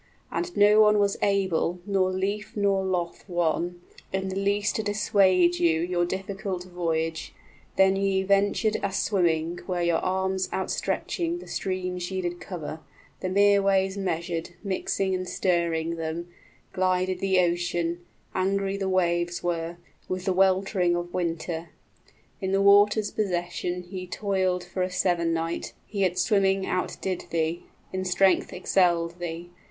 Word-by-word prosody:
And 350 0 -3
no 210 +1 +6
one 210 0 +5
was 200 -1 +2
able 185 -3 +1
Nor 195 -2 +2
lief 200 +3 -3
nor 200 -1 +2
loth 180 -2 -2
one, 175 0 -1 0.3
in 190 0 -2
the 190 - -4
least 200 +1 0
to - - 0
dissuade 190 -4 +3
you 165 -2 +3
Your 175 0 0
difficult 190 0 -4
voyage; 165 -3 -3 0.4
then 190 0 +5
ye 195 -1 +1
ventured 200 +2 +2
a 200 - -1
swimming, 175 -4 +1
15 - - -13
Where 180 -2 -1
your 170 -1 +2
arms 190 0 -1
outstretching 335 - -2
the 350 - -10
streams 180 -1 -3
ye 190 -1 -3
did 175 0 -3
cover, 160 -3 -6 0.4
The 185 - -3
mere 200 +1 +4
ways 195 -1 +2
measured, 175 -3 -3
mixing 195 -1 -1
and 185 0 -2
stirring 170 -2 0
them, 165 +2 -4 0.4
Glided 185 0 +1
the 190 -1 +2
ocean; 175 0 -1 0.3
angry 195 +1 0
the 195 -1 -2
waves 175 -2 0
were, 170 -1 -2 0.3
With 185 0 -3
the 190 - +2
weltering 190 -1 +2
of 175 0 -4
winter. 165 -1 -3 0.7
In 190 0 -1
the 195 - +3
water's 205 +1 +5
possession, 180 -2 -2
Ye 185 0 -6
toiled 185 -2 0
for 175 +1 -5
a 185 - +1
seven 175 -2 +1
night; 165 +1 -2
he 200 -2 -2
at 180 0 -1
swimming 195 0 +2
outdid 185 0 -2
thee, 165 +1 -1 0.2
20 185 - -3
In - - -2
strength 185 +1 +3
excelled 175 -2 +1
thee. 175 0 -5
185 Hz, 150 wpm, -26 LUFS, 175-195 Hz, 0.7 s, no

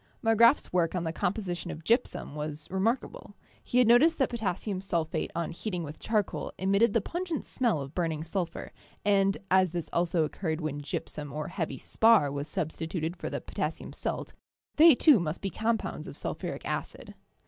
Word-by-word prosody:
Marg 225 -1 +2
grafs 235 -1 +5
work 175 -1 +2
on 175 - -1
the 160 -1 -2
composition 180 -1 -2
of 160 - -7
gypsum 230 - 0
was 150 0 -5
remark 220 +7 +2
able; 205 - -11 0.3
he 245 - -1
had 250 - +6
noticed 265 +9 +5
that 265 - +1
potassium 200 -3 -2
sulphate 170 -5 -1
on 170 -1 -2
heating 180 0 -4
with 150 0 -8
charcoal 215 -3 -1
emitted 200 +4 +3
the 230 - +3
pungent 345 - -3
smell 235 - 0
of 135 +1 -7
burning 160 -3 -1
sul 175 +1 -1
phur, - - -9 0.3
and 195 -1 +3
as 185 -2 +4
this 170 -2 -4
also 170 -1 +2
occurred 160 +1 -2
when 150 -3 -3
gypsum 145 0 -5
or 150 +2 -4
heavy 175 -3 -3
spar 220 -11 +4
was 140 +1 -4
substituted 160 0 -3
for - - -5
the - - -3
potassium - - -4
salt, - - -4 0.4
they 320 -1 +9
too 285 -3 +6
must 160 -1 -2
be 195 - -3
compounds 225 0 -2
of - - -9
sulphuric - - -4
acid. - - -5
185 Hz, 180 wpm, -29 LUFS, 160-225 Hz, 0.4 s, they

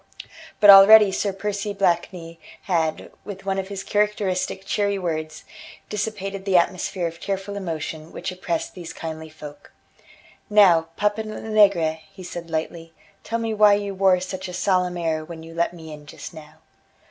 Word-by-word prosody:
But 205 -1 +9
already 200 +1 +9
Sir 200 +1 -1
Percy 205 +1 -4
Blakeney 170 -3 -1 0.2
had, 160 -4 -1
with 195 -1 -9
one 195 0 -1
of 190 - -4
his 195 -1 -6
characteristic 200 -2 -1
cheery 200 0 0
words, 155 -4 -4 0.5
dissipated 200 -2 -4
the 190 -2 +3
atmosphere 180 +1 0
of 165 0 -5
tearful 195 +1 -4
emotion 160 -4 -5
which - - -5
oppressed 175 -2 -4
these 175 -3 -9
kindly 160 -1 -7
folk. 150 -2 -12 0.8
"Now, 185 -6 +5
Papa 210 +1 0
Lenegre," 205 -7 +1
he 195 -1 -12
said 170 -1 -8
lightly, 165 +1 -4 0.3
"tell 230 - -2
me 225 -1 -2
why 210 -1 +5
you 200 -1 -3
wore 190 -1 +3
such 185 +1 -6
a 180 - -8
solemn 180 -1 0
air 160 -2 -1
when 160 0 -10
you 165 0 -11
let 170 +1 0
me 160 -3 -10
in 150 -1 -12
just - - -10
now." 155 -2 -13
185 Hz, 160 wpm, -23 LUFS, 165-200 Hz, 0.8 s, But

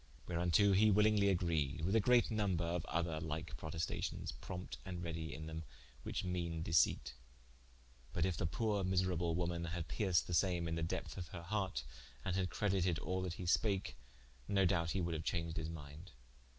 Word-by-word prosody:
Whereunto 90 +4 +3
hee 105 +3 +6
willingly 105 0 +5
agreed, 80 -6 +1
with 95 +7 +1
a - - +6
great 120 +3 +4
nomber 100 -6 +1
of 85 0 -1
other 80 -2 -1
like 80 -1 -4
protestations, 80 +3 -3
prompte 90 +1 -7
and 90 -2 -5
redy 80 -2 -4
in 80 +1 -6
them 80 0 -5 0.4
which - - -3
meane 85 -3 -2
deceipt. 75 -6 +3 1.0
But - - +1
in 95 - +1
the 90 - 0
poore 100 +4 0
miserable 90 -3 +1
woman 85 -1 -1
had 85 -1 -3
perced 95 -6 +2
the 90 - -4
same 85 -1 +2
in 80 - -2
the 80 - -1
depth 80 - -3
of 90 - -5
her 85 0 -8
harte, 95 -8 -1 0.4
and 95 - 0
had 95 -1 +1
credited 95 -5 +1
all 95 +5 -2
that 90 -2 -2
he 90 - -6
spake, 95 +4 +1 0.5
no 100 -1 +3
doubte 85 -1 +2
he 95 - 0
woulde 85 -2 -1
haue - - -4
chaunged 85 -1 -2
his 80 0 -2
minde. 80 +1 -9
85 Hz, 185 wpm, -37 LUFS, 80-95 Hz, 1.0 s, hee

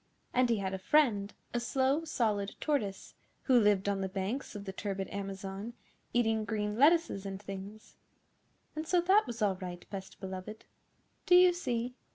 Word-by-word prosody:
And 250 -1 +3
he 230 - +3
had 195 -1 -2
a 190 - -3
friend, 210 -4 +3 0.2
a 240 - +1
Slow 270 +5 +1
Solid 210 -9 -1
Tortoise, 215 -11 -2 0.3
who 255 -3 +5
lived 205 -3 +3
on 200 -1 0
the 190 - -2
banks 200 +8 -3
of 200 -1 -6
the 190 - -5
turbid 195 -1 -3
Amazon, 195 +2 -5 0.4
eating 225 -2 +2
green 210 -1 -2
lettuces 295 - +4
and 195 -1 -5
things. 195 +2 -9 0.8
And 310 +1 -4
so 360 - +3
that 380 0 +4
was 235 -2 -3
all 195 -3 +2
right, 180 -2 -7
Best 190 -1 -7
Beloved. 190 +3 -7 0.6
Do 355 - +7
you 360 0 +7
see? 250 -8 -2
210 Hz, 170 wpm, -32 LUFS, 195-255 Hz, 0.8 s, Do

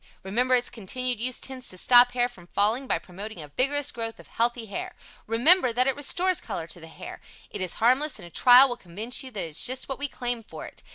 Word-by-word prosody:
Remember 245 +7 +1
its 245 0 -1
continued 245 +2 -3
use 255 +1 -1
tends 260 -2 -4
to 185 - -5
stop 245 +5 +6
hair 245 -1 +1
from 180 -8 -16
falling 220 +8 0
by - - +1
promoting 195 +2 -9
a 150 -2 -9
vigorous 280 - 0
growth 225 -1 -5
of - - -15
healthy 235 0 0
hair. 205 - -6 0.3
Remember 250 - +4
that 250 +2 +1
it 270 - +1
restores 350 +6 +1
color 190 -7 -5
to 170 - -9
the 165 - -12
hair. 160 - -10 0.3
It - - -6
is 185 -2 0
harmless 260 +7 +2
and 185 - -10
a 170 - -13
trial 250 +6 +7
will 245 -2 -5
convince 215 +6 -4
you 260 - -8
that 215 -5 -7
it - - -7
is 150 - 0
just 255 +1 -2
what 270 - -6
we 285 - -2
claim 245 -3 -3
for 220 - -10
it. - - -12
245 Hz, 240 wpm, -26 LUFS, 205-255 Hz, 0.3 s, trial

